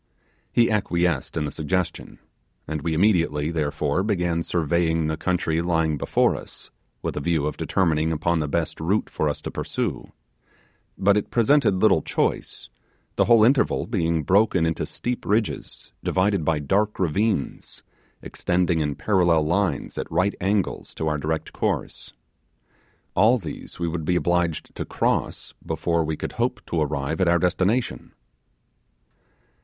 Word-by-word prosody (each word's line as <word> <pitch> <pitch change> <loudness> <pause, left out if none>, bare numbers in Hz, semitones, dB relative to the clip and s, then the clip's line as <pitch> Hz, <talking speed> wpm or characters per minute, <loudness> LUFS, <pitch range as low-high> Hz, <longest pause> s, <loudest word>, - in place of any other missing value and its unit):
He 120 -1 +3
acquiesced 85 -8 0
in 75 - 0
the 75 - -4
suggestion; 85 +2 -3 0.5
and 80 -1 -3
we 80 +1 -1
immediately, 85 -5 +2
therefore, 75 0 0
began 90 -5 0
surveying 80 -1 0
the 80 0 -1
country 85 -1 0
lying 80 -3 0
before - - +2
us, - - -10 0.3
with - - -3
a - - -1
view 80 0 0
of 75 - -2
determining 80 -4 +1
upon 80 +2 0
the 75 - -1
best 80 +2 -2
route 95 +7 0
for 75 - 0
us 75 - -4
to - - -5
pursue; - - -3 0.9
but 100 +1 +3
it 105 - -2
presented 125 -2 +3
little 95 -4 +4
choice, - - -2 0.5
the - - +3
whole 115 -2 +6
interval 130 +4 +3
being 85 -7 0
broken 95 0 +3
into 80 0 -1
steep 125 0 -4
ridges, 105 +2 -2
divided 95 -1 +1
by 80 +1 +1
dark 100 +9 0
ravines, 95 0 -1 0.4
extending 90 -1 0
in 75 -2 -1
parallel 85 -6 +2
lines 90 +4 -1
at - - -5
right 90 +5 +2
angles 100 +1 -1
to 80 - -2
our 75 -1 0
direct 80 +1 -3
course. - - -2 1.0
All 110 +7 +5
these 85 -9 -8
we 85 - -2
would 80 -1 -3
be 90 - +1
obliged 85 -2 0
to - - -4
cross - - -1
before 80 +1 0
we 80 0 -3
could - - -4
hope - - -1
to 85 - -1
arrive 75 +2 -1
at 95 - +3
our 85 0 +4
destination. 95 +7 0
85 Hz, 150 wpm, -24 LUFS, 80-95 Hz, 1.0 s, whole